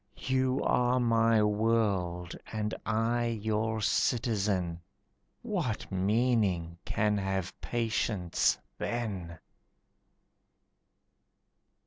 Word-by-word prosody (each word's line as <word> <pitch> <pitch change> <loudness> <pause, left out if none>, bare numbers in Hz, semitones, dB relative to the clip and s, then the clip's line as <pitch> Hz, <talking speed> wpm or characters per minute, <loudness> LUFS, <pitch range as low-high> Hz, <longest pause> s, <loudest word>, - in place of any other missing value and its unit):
You 130 0 0
are 125 +1 +2
my 115 -2 +3
world 105 -5 0 0.2
and 105 -1 -2
I 115 +2 +1
your 110 -1 -1
citizen. 100 -8 +1 0.6
What 175 - -2
meaning 95 -4 +1
can 105 -1 +1
have 95 -2 -3
patience 110 -6 0 0.2
then? 95 -8 -3
110 Hz, 70 wpm, -30 LUFS, 95-115 Hz, 0.6 s, my